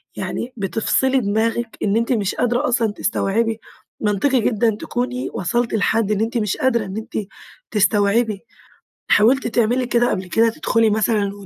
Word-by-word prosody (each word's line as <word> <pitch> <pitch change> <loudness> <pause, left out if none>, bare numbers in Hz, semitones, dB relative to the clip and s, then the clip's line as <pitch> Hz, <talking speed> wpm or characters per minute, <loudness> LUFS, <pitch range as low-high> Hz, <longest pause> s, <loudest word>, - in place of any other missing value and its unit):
يعني 250 +2 -4
بتفصلي 225 +7 +1
دماغِك، 225 +2 -1
إن 205 +1 +1
أنتِ 230 +2 0
مش 205 -4 -1
قادرة 245 +4 0
أصلًا 235 -3 +1
تستوعبي، 225 +2 -1 0.4
منطقي 220 +5 +1
جدًا 220 0 +1
تكوني 250 +1 -3
وصلتِ 235 +7 -1
لحد 220 0 +1
إن 210 - 0
أنتِ 230 +2 -1
مش 210 -4 -1
قادرة 235 -4 +1
إن 190 +2 -6
أنتِ 220 -2 -5 0.4
تستوعبي، 210 +1 +1 0.6
حاولتِ 245 +6 +4
تعملي 240 +2 +1
كده 240 0 +2
قبل 190 -1 -2
كده، 225 +4 +3
تدخلي 225 0 +1
مثلًا 210 -1 +1
225 Hz, 145 wpm, -20 LUFS, 210-240 Hz, 0.6 s, حاولتِ